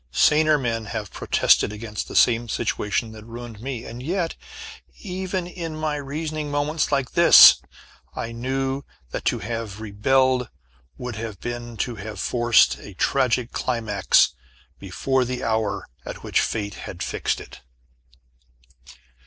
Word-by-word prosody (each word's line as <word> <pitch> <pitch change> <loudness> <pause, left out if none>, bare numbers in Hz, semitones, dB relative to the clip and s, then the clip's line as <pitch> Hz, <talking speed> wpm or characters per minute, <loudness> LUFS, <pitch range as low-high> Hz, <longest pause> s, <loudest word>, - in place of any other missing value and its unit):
Saner 155 - +4
men 115 -4 -2
have - - -5
protested - - +3
against 105 0 -6
the - - -8
same 120 -1 +4
situation 105 +2 -1
that 110 -1 -11
ruined 115 -1 -9
me 125 -2 -5
and 120 +2 -8
yet, 170 +4 -2 0.6
even 185 -2 -4
in 170 -3 -6
my 155 -1 -2
reasoning 150 +2 -4
moments, 145 +2 -1
like 140 -3 0
this, 170 0 +9 0.5
I 115 - -4
knew 135 +3 -2 0.3
that - - -5
to - - +2
have 115 -2 -5
rebelled 125 +4 +1 0.5
would 125 -3 -6
have 110 -2 -6
been 120 -1 -6
to 120 -2 -7
have 105 +2 -7
forced 120 -1 +3
a 100 - -11
tragic 125 +1 +1
climax 110 -5 +2 0.5
before 130 +8 0
the 125 +1 -4
hour 110 -2 -1 0.2
at - - -8
which - - +1
Fate 100 -2 -2 0.2
had - - -6
fixed - - -2
it. - - -12
120 Hz, 135 wpm, -23 LUFS, 110-145 Hz, 0.6 s, this